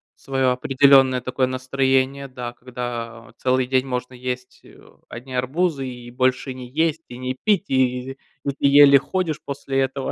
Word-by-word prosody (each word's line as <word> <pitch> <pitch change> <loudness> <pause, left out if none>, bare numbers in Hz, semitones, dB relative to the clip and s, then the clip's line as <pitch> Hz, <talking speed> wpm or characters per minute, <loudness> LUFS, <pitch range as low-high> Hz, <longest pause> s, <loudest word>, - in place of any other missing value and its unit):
своё 135 -2 0
определённое 130 0 +4
такое 130 0 -1
настроение, 135 +1 0
да, 125 -2 -7
когда 120 -2 -6
вот 115 - -18
целый 130 0 +1
день 130 +1 0
можно 125 0 -4
есть, 125 0 -6
э, - - -17 0.3
одни 130 +2 -9
арбузы 135 +2 -1
и 120 -1 -9
больше 130 +1 0
не 125 -1 -9
есть, 160 +3 0
и 120 - -10
не 130 0 -4
пить, 205 -2 +1
и 130 0 0 0.3
и - - 0
ты - - 0
еле 140 -1 +8
ходишь 165 -1 -3
после 135 -1 -3
этого. 135 0 -1
130 Hz, 165 wpm, -22 LUFS, 125-135 Hz, 0.3 s, еле